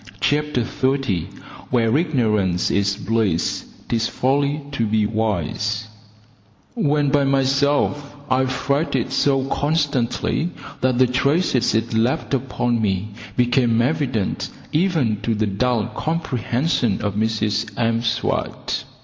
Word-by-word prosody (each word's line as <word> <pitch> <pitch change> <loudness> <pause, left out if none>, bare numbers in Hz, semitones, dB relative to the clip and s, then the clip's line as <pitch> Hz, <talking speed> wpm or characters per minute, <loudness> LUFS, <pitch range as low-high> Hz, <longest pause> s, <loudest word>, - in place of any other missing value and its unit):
CHAPTER 150 -4 +1
THIRTY 130 - 0 0.4
Where 115 -1 +2
Ignorance 110 - +1
is 100 0 +1
Bliss, 105 -5 0 0.2
'Tis 115 -1 0
Folly 140 +3 0
to 115 -5 0
be 105 0 +2
Wise 110 0 -1 0.8
When 145 - +1
by 140 0 +3
myself, 140 +1 +1
I 130 -1 +2
fretted 140 +4 -1
so 135 -2 +2
constantly 145 +1 0 0.3
that 130 -1 +2
the 130 - +6
traces 130 0 +1
it 115 +1 0
left 120 +8 0
upon 120 -3 0
me 100 0 0 0.3
became 120 -2 +3
evident 120 -5 0 0.2
even 150 - +1
to 115 - 0
the 110 +1 +1
dull 105 +3 0
comprehension 130 - -1
of 100 -1 -1
Mrs 110 +1 0
M'Swat. 115 0 -1
125 Hz, 110 wpm, -21 LUFS, 110-140 Hz, 0.8 s, the